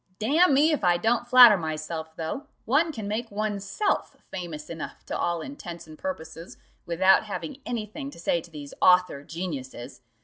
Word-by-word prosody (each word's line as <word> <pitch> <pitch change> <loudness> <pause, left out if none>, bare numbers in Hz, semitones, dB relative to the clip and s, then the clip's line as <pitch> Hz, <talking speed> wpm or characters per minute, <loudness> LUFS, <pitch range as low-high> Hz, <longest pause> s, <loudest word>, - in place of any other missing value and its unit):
"Damn 290 +7 +3
me, 300 +4 +4
if 300 - -1
I 175 -1 +4
don't 235 +5 0
flatter 245 -4 +9
myself, 160 0 -5
though, 170 - -5 0.2
one 300 +8 +2
can 220 -8 -6
make 225 +3 -3
oneself 205 - -2 0.2
famous 165 -5 -6
enough 165 -1 -8
to - - -4
all 170 -1 -1
intents 175 - -8
and 155 -1 -12
purposes 165 - -7 0.3
without 185 +4 +4
having 270 +7 -6
any 235 -3 -2
thing 275 +7 -7
to 280 - -13
say 170 0 0
to 170 - -15
these 145 -3 -9
author 180 -6 +4
geniuses. 145 -8 -7
190 Hz, 170 wpm, -26 LUFS, 160-245 Hz, 0.3 s, flatter